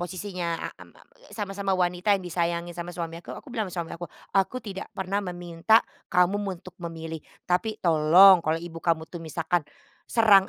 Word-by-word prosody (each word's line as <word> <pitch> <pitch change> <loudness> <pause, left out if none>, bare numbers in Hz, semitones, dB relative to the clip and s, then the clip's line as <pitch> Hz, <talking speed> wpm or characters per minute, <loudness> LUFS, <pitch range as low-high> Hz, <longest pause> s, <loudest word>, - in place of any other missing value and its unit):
posisinya 175 -1 -3 0.2
am - - -12
a - - -19
a - - -23
sama-sama 195 -2 -1
wanita 180 +3 +2
yang 190 - -8
disayangi 170 0 -1
sama 170 0 -6
suami 170 -1 -5
aku - - -8
aku - - -11
bilang 220 -5 -1
sama 175 -1 -3
suami - - -10
aku, 175 - -4 0.3
"aku 195 +5 +2
tidak 195 -2 -6
pernah 195 +2 -1
meminta 175 +3 +2 0.2
kamu 180 +3 +3 0.2
untuk 185 0 -13
memilih, 165 -1 -6 0.2
tapi 210 +5 0
tolong 170 +4 +8
kalau 160 0 0
ibu 165 0 -7
kamu 165 -1 +1
tuh 175 - -6
misalkan 165 +2 -1 0.5
serang 205 -4 +6
180 Hz, 175 wpm, -26 LUFS, 170-195 Hz, 0.5 s, tolong